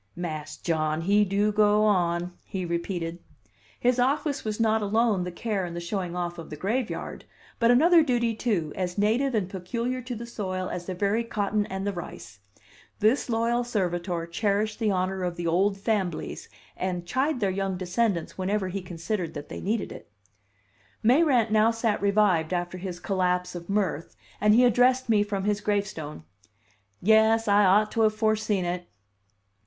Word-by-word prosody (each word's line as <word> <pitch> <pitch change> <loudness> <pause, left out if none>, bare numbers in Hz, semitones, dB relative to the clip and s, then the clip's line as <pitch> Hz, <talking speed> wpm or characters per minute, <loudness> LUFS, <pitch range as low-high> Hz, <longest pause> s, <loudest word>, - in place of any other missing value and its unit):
"Mas' 155 -3 -5
John 155 -1 -1
he 200 +4 +3
do 205 +2 +1
go 210 0 +4
on," 175 -3 +1
he 190 -3 -4
repeated. 170 0 -3 0.6
His 250 +1 +2
office 280 +3 +1
was 215 0 -3
not 220 -1 +2
alone 210 -2 +1
the 180 - -4
care 200 +2 -2
and 170 -1 -5
the - - -3
showing 175 0 -3
off 175 -1 -3
of 165 - -9
the 150 - -6
graveyard, 220 - -3 0.3
but 230 0 +4
another 325 +8 +6
duty, 240 -5 +1
too, 205 -9 -1
as 180 0 -3
native 230 +6 +2
and 205 -4 0
peculiar 235 +7 -3
to 245 0 -5
the 235 +1 -6
soil 185 -5 -4
as 175 -1 -5
the 185 - -3
very 205 +5 +1
cotton 210 -2 -1
and 190 +1 -4
the 205 - -1
rice: 170 - -9 0.6
this 225 +5 +2
loyal 235 +1 +1
servitor 175 -6 -2
cherished 210 +4 -1
the 220 -2 +1
honor 190 0 -1
of 180 -1 -2
the 175 - -5
"old 190 +4 +2
famblies," 195 -5 -2 0.3
and 180 -2 -3
chide 260 - 0
their 200 -4 +1
young 195 -1 -2
descendants 185 -1 -1
whenever 190 0 -1
he 195 +2 -4
considered 175 +1 -4
that 145 0 -7
they - - -6
needed 215 +2 -1
it. - - -11 0.9
Mayrant 250 -2 +4
now 215 +1 +5
sat 225 -2 0
revived 200 -5 +2
after 175 +1 -3
his 180 -1 -6
collapse 180 -1 0
of 175 0 -8
mirth, 195 -6 -1 0.3
and 210 +1 +5
he 250 +2 +6
addressed 250 +1 +3
me 215 -2 +4
from 205 -2 -2
his 205 0 0
gravestone. 180 - -3 0.8
"Yes, 220 +2 +4
I 205 0 +5
ought 210 +3 +4
to 230 - 0
have 215 -1 +3
foreseen 215 -3 +1
it." 175 0 -3
200 Hz, 170 wpm, -26 LUFS, 180-225 Hz, 0.9 s, another